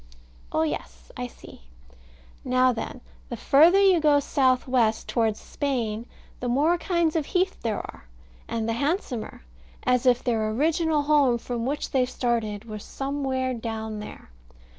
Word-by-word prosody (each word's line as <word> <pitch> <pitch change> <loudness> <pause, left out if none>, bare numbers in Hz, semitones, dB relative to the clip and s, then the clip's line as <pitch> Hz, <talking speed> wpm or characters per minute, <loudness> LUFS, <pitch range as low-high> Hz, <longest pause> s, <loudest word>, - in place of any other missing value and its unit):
Oh 160 - +1
yes, - - -5
I - - -4
see. - - -15 0.8
Now 255 0 +3
then 240 +2 -6 0.3
The 240 - -5
farther 325 - +5
you 385 -3 +5
go 300 -2 +4
south 260 -2 +1
west, 235 -4 +1
towards 225 -3 0
Spain, 235 -5 -3 0.3
the 250 - -3
more 300 +8 +2
kinds 340 -3 0
of 310 -3 0
heath 370 +1 0
there 220 -3 -1
are, 60 - -9 0.4
and 225 -1 -2
the 230 - 0
handsomer; 275 - -2 0.4
as 250 +1 +2
if 245 -1 +4
their 220 -3 0
original 310 +5 +1
home, 285 -5 +3
from 235 0 -4
which 290 +2 -3
they 255 -2 +2
started, 230 -4 -2
was 215 -2 -7
somewhere 270 -2 -2
down 220 -2 -5
there. 210 - -10
250 Hz, 150 wpm, -25 LUFS, 225-290 Hz, 0.8 s, farther